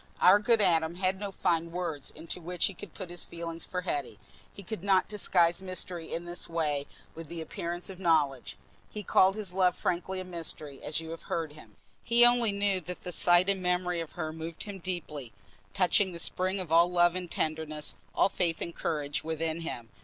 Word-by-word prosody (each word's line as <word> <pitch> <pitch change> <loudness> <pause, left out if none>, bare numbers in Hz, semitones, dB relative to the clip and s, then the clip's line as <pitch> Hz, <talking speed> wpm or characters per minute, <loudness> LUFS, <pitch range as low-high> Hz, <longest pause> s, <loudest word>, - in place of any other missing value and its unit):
Our 190 +3 +7
good 225 +1 +3
Adam 165 -3 +3
had 185 +1 0
no 200 -1 -4
fine 170 -3 0
words 165 -6 -3
into 165 +3 -6
which 175 +1 0
he 195 - 0
could 185 -1 -11
put 185 -3 -7
his 175 - -1
feeling 165 -1 -5
for 180 +1 -2
Hetty: 145 - -3 0.3
he 200 - -11
could 215 -2 -6
not 195 -2 +3
disguise 180 -4 +3
mystery 180 -3 -3
in 170 +1 -3
this 175 0 -3
way 150 -4 0 0.3
with 165 -1 -8
the 170 +2 -6
appearance 170 +2 -4
of 190 -2 -7
knowledge; 155 -7 +1 0.3
he 210 - -6
called 190 +1 +4
his 205 -4 -2
love 185 -1 +3
frankly 185 +2 -1
a - - -4
mystery, 160 -5 -4
as 155 - -1
you 160 0 -7
have 165 - -7
heard 160 -3 -2
him. 155 - -15 0.3
He 235 +1 +5
only 240 -2 +4
knew 200 -1 +1
that 180 +2 -7
the 180 - -4
sight 175 +1 +5
and 195 -1 +1
memory 180 -1 0
of 165 - -7
her 155 -2 -4
moved 160 0 -6
him 205 -2 -7
deeply, 150 - -5 0.4
touching 190 0 +2
the - - -6
spring 185 +3 0
of 180 -4 -5
all 170 +2 +6
love 175 -1 +4
and 180 -1 -4
tenderness, 155 -2 -2 0.2
all - - +5
faith 170 -4 -1
and 170 - -4
courage 145 -3 -2
within 160 0 -2
him. 120 -8 -6
175 Hz, 205 wpm, -30 LUFS, 160-185 Hz, 0.4 s, Our